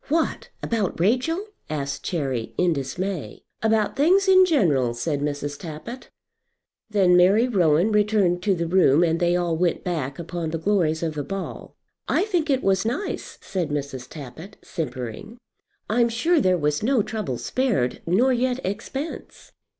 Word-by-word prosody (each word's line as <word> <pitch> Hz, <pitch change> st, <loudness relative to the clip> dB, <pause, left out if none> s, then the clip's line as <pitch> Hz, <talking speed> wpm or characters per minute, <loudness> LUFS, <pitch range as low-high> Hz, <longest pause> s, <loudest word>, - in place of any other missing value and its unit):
"What! 320 Hz, +3 st, -1 dB
about 215 Hz, -8 st, -1 dB
Rachel?" 255 Hz, -, +1 dB, 0.2 s
asked 140 Hz, -2 st, -3 dB
Cherry, 135 Hz, -9 st, -3 dB
in 180 Hz, -2 st, +3 dB
dismay. 150 Hz, -, -4 dB, 0.2 s
"About 220 Hz, -1 st, +1 dB
things 370 Hz, +7 st, +4 dB
in 375 Hz, -1 st, +7 dB
general," 150 Hz, -, +2 dB
said 145 Hz, +4 st, -2 dB
Mrs. 145 Hz, 0 st, -3 dB
Tappitt. 175 Hz, +10 st, -8 dB, 0.8 s
Then 190 Hz, -4 st, +4 dB
Mary 195 Hz, +7 st, +5 dB
Rowan 180 Hz, -3 st, +3 dB
returned 205 Hz, -4 st, +2 dB
to 195 Hz, 0 st, +2 dB
the 170 Hz, -1 st, -2 dB
room, 165 Hz, -3 st, +4 dB
and 165 Hz, -1 st, +1 dB
they 175 Hz, 0 st, +2 dB
all 175 Hz, -2 st, 0 dB
went 175 Hz, +1 st, 0 dB
back 150 Hz, -7 st, -3 dB
upon 170 Hz, -1 st, -4 dB
the 165 Hz, -, -2 dB
glories 165 Hz, -3 st, +1 dB
of 160 Hz, -2 st, -1 dB
the 150 Hz, -1 st, -3 dB
ball. 195 Hz, +3 st, -6 dB, 0.3 s
"I -, -, +2 dB
think 350 Hz, -7 st, -1 dB
it 265 Hz, -2 st, +1 dB
was 195 Hz, 0 st, +2 dB
nice," 250 Hz, -, -3 dB
said 180 Hz, -5 st, -3 dB
Mrs. 140 Hz, -3 st, -4 dB
Tappitt, 155 Hz, +7 st, -10 dB
simpering. 150 Hz, -, -6 dB, 0.5 s
"I'm 235 Hz, +2 st, +2 dB
sure 300 Hz, +8 st, +2 dB
there 185 Hz, -3 st, +3 dB
was 150 Hz, -2 st, 0 dB
no 240 Hz, 0 st, +2 dB
trouble 210 Hz, -, -3 dB
spared, 225 Hz, -, -1 dB
nor 240 Hz, +10 st, +3 dB
yet 250 Hz, +1 st, 0 dB
expense." 250 Hz, -, -6 dB
180 Hz, 155 wpm, -24 LUFS, 155-230 Hz, 0.8 s, in